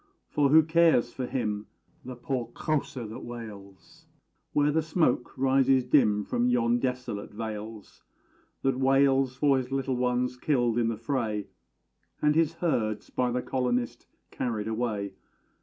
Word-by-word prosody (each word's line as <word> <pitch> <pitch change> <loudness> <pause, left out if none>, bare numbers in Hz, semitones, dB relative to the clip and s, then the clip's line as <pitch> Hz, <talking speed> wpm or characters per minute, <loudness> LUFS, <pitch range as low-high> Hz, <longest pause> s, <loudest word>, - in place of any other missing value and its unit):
For 145 -2 +2
who 160 +2 +7
cares 160 -7 +3
for 130 -2 -4
him, 105 -5 -2 0.4
the 130 0 -7
poor 125 -1 -3
Kósa, 140 -6 -2
that 110 - -8
wails 115 +7 -10 0.4
Where 145 0 +2
the 160 +2 +2
smoke 155 -6 0
rises 135 0 +3
dim 110 -6 +3
from 245 0 0
yon 245 0 +2
desolate 125 - -3
vales 110 0 -7 0.6
That 135 -1 +1
wails 135 -1 +3
for 140 0 +3
his 130 0 -4
little 135 -1 -1
ones 125 0 0
killed 120 -4 +1
in 115 - +2
the 115 -1 -2
fray, 110 -4 -2 0.7
And 150 0 +3
his 165 0 +2
herds 125 -11 -1
by 125 -1 0
the 125 +1 -1
colonist 125 -2 -2 0.2
carried 110 -4 -3
away? 110 -4 -2
125 Hz, 140 wpm, -28 LUFS, 115-145 Hz, 0.7 s, who